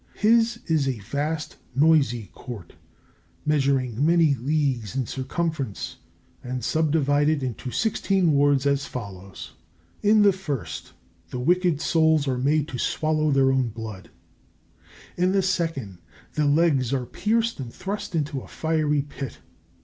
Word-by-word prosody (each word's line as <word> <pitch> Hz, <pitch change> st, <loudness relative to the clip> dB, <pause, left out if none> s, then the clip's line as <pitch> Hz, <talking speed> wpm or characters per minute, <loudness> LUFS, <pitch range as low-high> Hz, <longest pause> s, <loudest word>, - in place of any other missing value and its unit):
His 230 Hz, +2 st, +3 dB
is 155 Hz, -4 st, +1 dB
a 130 Hz, -3 st, -1 dB
vast, 145 Hz, +9 st, -3 dB, 0.2 s
noisy 135 Hz, -, +3 dB
Court, 115 Hz, -, -9 dB, 0.7 s
measuring 135 Hz, -4 st, +1 dB
many 165 Hz, -2 st, +4 dB
leagues 130 Hz, -5 st, -1 dB
in 130 Hz, -2 st, 0 dB
circumference 135 Hz, -, -3 dB, 0.5 s
and 125 Hz, 0 st, -4 dB
subdivided 150 Hz, -2 st, +2 dB
into 125 Hz, 0 st, -4 dB
sixteen 195 Hz, -, +1 dB
wards, 140 Hz, -1 st, +3 dB
as 140 Hz, 0 st, +1 dB
follows: 100 Hz, -5 st, -8 dB, 0.5 s
In 210 Hz, 0 st, +5 dB
the 200 Hz, -1 st, +6 dB
first, 155 Hz, -, -5 dB, 0.4 s
the 125 Hz, -, -5 dB
wicked 175 Hz, +2 st, +2 dB
souls 160 Hz, -3 st, +3 dB
are 130 Hz, -2 st, 0 dB
made 145 Hz, +3 st, +2 dB
to 125 Hz, -, -5 dB
swallow 155 Hz, +2 st, +1 dB
their 135 Hz, -1 st, +4 dB
own 130 Hz, -2 st, +1 dB
blood. 110 Hz, -3 st, -8 dB, 1.1 s
In 180 Hz, +2 st, +2 dB
the 195 Hz, -1 st, +2 dB
second, 160 Hz, -, -2 dB, 0.3 s
their 150 Hz, -, +1 dB
legs 145 Hz, -4 st, +3 dB
are 130 Hz, -2 st, 0 dB
pierced 225 Hz, -, 0 dB
and 125 Hz, -3 st, -5 dB
thrust 195 Hz, -, -5 dB
into 150 Hz, -3 st, -1 dB
a -, -, -12 dB
fiery 155 Hz, -3 st, 0 dB
pit. 140 Hz, -2 st, -7 dB
145 Hz, 135 wpm, -25 LUFS, 130-160 Hz, 1.1 s, the